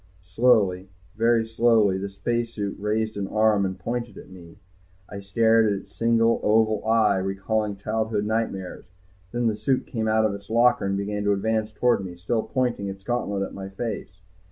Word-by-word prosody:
Slowly, 95 -2 +2 0.3
very 115 +1 +2
slowly, 110 -4 +3
the 100 +1 -4
spacesuit 115 0 -3
raised 110 +1 -1
an 100 -1 -2
arm 105 -2 +2
and 95 - -6
pointed 120 0 -4
at - - -12
me. 85 -3 -13 0.5
I 100 - -8
stared 110 +3 +3
at 105 - +2
its - - -19
single, 115 0 +2
oval 110 0 +2
eye, 110 -3 +3
recalling 100 +2 -1
childhood 110 +1 -2
nightmares. 105 -4 -3 0.5
Then 120 0 -1
the 110 -2 +1
suit 125 +5 0
came 110 -2 -3
out 110 0 +3
of 105 - 0
its 100 0 -10
locker 115 -2 +3
and 100 0 -1
began 105 +1 -3
to 100 - +3
advance 110 +2 -1
toward 115 -1 +1
me, 90 -2 -7
still 110 +6 -1
pointing 125 -5 -2
its 95 0 -7
gauntlet 105 -4 -2
at - - -6
my 95 0 -7
face. 100 -3 -6
110 Hz, 180 wpm, -24 LUFS, 100-115 Hz, 0.5 s, slowly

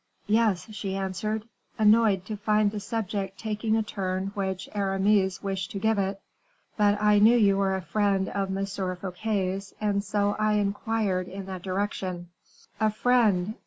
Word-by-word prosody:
"Yes," 215 -3 +2
she 195 -2 -4
answered, 200 +3 -3 0.3
annoyed 215 -3 +4
to 215 - -4
find 210 0 +2
the 210 - -4
subject 200 -3 -3
taking 215 +1 -1
a 220 - +1
turn 190 -1 -3
which 190 -2 -3
Aramis 195 -1 +1
wished 190 -2 -3
to - - -3
give 220 0 +1
it; 195 0 -1 0.6
"but 205 -1 +3
I 210 0 +4
knew 225 +4 +6
you 200 -3 +4
were 195 -1 +1
a 190 - -4
friend 200 -1 +1
of 195 -1 -2
M. 195 - -1
Fouquet's, 190 +1 -3
and 205 -1 0
so 205 0 0
I 215 0 +2
inquired 205 -2 0
in 195 0 -7
that 190 -1 -6
direction." 185 -2 -3 0.5
"A 215 0 +3
friend! 215 -4 +2
200 Hz, 160 wpm, -27 LUFS, 190-215 Hz, 0.6 s, knew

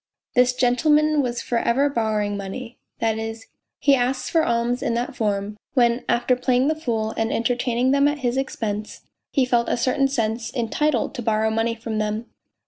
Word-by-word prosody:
This 250 -1 +4
gentleman 295 +5 +3
was 245 -2 -2
for 235 - 0
ever 265 +6 +2
borrowing 215 -5 0
money, 225 +5 -7 0.2
that 220 -1 0
is. 225 0 -5 0.3
he 280 - +3
asked 255 0 0
for 325 -2 +3
alms 235 -1 0
in 230 - 0
that 240 +1 -2
form, 205 -1 -2 0.2
when 240 -1 +3
after 245 +1 +2
playing 255 +2 +2
the 315 - +1
fool 225 -8 -2
and 225 0 0
entertaining 245 +1 +1
them 280 +1 +4
at 295 +1 0
his 240 0 +1
expense 215 -6 -3 0.3
he 270 -3 +2
felt 240 -1 +1
in - - +1
a - - -6
certain 260 +3 +2
sense 230 -3 -2
entitled 250 +2 0
to - - -5
borrow 220 -1 +1
money 225 +1 0
from 225 -1 -4
them. 215 +2 -2
240 Hz, 185 wpm, -23 LUFS, 225-255 Hz, 0.3 s, This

